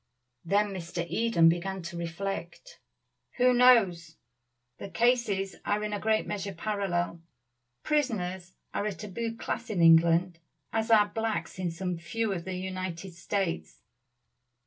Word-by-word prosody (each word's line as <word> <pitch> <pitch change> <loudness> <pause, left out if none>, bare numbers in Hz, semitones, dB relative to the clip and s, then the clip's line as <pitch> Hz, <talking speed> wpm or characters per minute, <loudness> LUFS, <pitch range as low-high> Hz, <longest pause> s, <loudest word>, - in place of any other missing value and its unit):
Then 200 +3 +1
Mr. 170 -2 -4
Eden 225 -5 +3
began 180 +3 0
to 170 +1 -7
reflect. 175 - -5 0.6
"Who 250 0 +5
knows? 195 -10 +4 0.6
The - - -7
cases 230 -5 +1
are 210 +1 0
in 210 0 -3
a 205 - -2
great 220 +1 +1
measure 200 -1 -4
parallel. 175 -3 -2 0.6
Prisoners 190 -11 -1 0.2
are 205 - -1
a 210 - -2
tabooed 220 +4 -5
class - - -4
in 205 -5 -2
England, 165 +1 +5 0.3
as 225 +1 0
are 210 -2 +5
blacks 215 -6 -3
in 180 -2 -1
some 175 +1 -4
few 205 +6 -2
of 170 -3 -5
the 190 -1 -4
United 185 -1 -5
States. 175 - -3
190 Hz, 135 wpm, -29 LUFS, 170-215 Hz, 0.6 s, Who